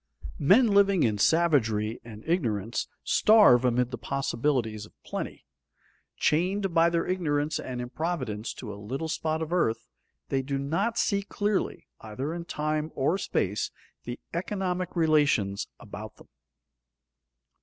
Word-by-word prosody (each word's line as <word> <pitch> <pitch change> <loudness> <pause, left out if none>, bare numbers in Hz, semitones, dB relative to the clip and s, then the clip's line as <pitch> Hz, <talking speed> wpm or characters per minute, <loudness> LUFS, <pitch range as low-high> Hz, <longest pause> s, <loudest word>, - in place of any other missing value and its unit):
Men 195 - +6
living 200 -3 +4
in 105 -3 +1
savagery 115 -9 +2
and 110 -2 -11
ignorance 115 - -1 0.2
starve 210 - +6
amid 125 0 +1
the - - -5
possibilities 120 -5 -1
of - - -26
plenty. - - -6 0.7
Chained 185 +4 +1
by 165 +1 +5
their 170 0 0
ignorance 155 -5 0
and 125 -1 -5
improvidence 125 -4 -3
to 105 -4 -7
a 100 - -10
little 135 +10 -4
spot 160 0 -1
of 160 +2 -5
earth, 115 -11 0 0.4
they 135 - +1
do 135 +1 -3
not 165 +12 -1
see 200 -1 +2
clearly, 205 0 -2
either 130 +8 -5
in 170 0 -5
time 155 -1 -2
or 160 +8 +1
space, 100 - -1 0.4
the 120 0 -5
economic 185 0 -2
relations 145 - +2
about - - -9
them. - - -18
150 Hz, 135 wpm, -27 LUFS, 120-175 Hz, 0.7 s, Men